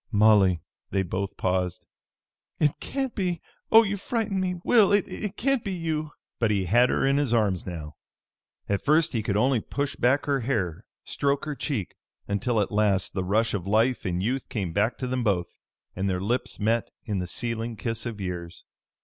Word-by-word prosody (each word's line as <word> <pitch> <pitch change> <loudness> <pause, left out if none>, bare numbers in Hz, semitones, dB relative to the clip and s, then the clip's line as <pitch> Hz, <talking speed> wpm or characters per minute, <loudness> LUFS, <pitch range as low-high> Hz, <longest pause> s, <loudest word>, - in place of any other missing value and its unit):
"Molly!" 100 -6 +5 0.3
They 95 -1 +1
both 95 +2 -3
paused. 90 -1 -1 0.7
"It 150 -2 +4
can't 270 -3 -3
be! 180 -4 -1 0.3
Oh, 225 +1 +9
you 205 -1 -2
frightened 210 -2 -1
me, 180 -1 -1
Will! 220 -5 +5
It 205 0 0
can't 275 -1 +1
be 195 - -3
you!" 155 -3 -2 0.3
But 115 - +2
he 100 -3 +1
had 120 +7 +4
her - - +1
in 135 +1 +3
his 135 -5 +2
arms 100 -6 +1
now. 75 -4 -7 0.7
At 100 -1 -1
first 155 +1 +3
he 115 - 0
could 100 -1 -1
only 125 +2 +3
push 145 +4 -3
back 130 +4 +2
her 140 -1 +1
hair, 105 -8 -2 0.2
stroke 140 0 -1
her 150 - -2
cheek, 130 - -3 0.3
until 110 +3 0
at 100 - -2
last 105 -3 +1
the 95 - -1
rush 110 +5 +1
of 95 -3 -3
life 115 +4 +2
and 90 0 -1
youth 130 +5 -1
came 95 -7 -3
back 105 +6 +1
to 130 - -3
them 125 0 -1
both, 95 -6 0 0.4
and 95 +1 -1
their 90 -1 0
lips 115 +7 -1
met 115 +2 +1 0.2
in 105 -5 -1
the 90 - -3
sealing 115 +2 -3
kiss 115 +2 -3
of 110 -3 -6
years. 90 -3 -5
115 Hz, 190 wpm, -26 LUFS, 95-145 Hz, 0.7 s, Oh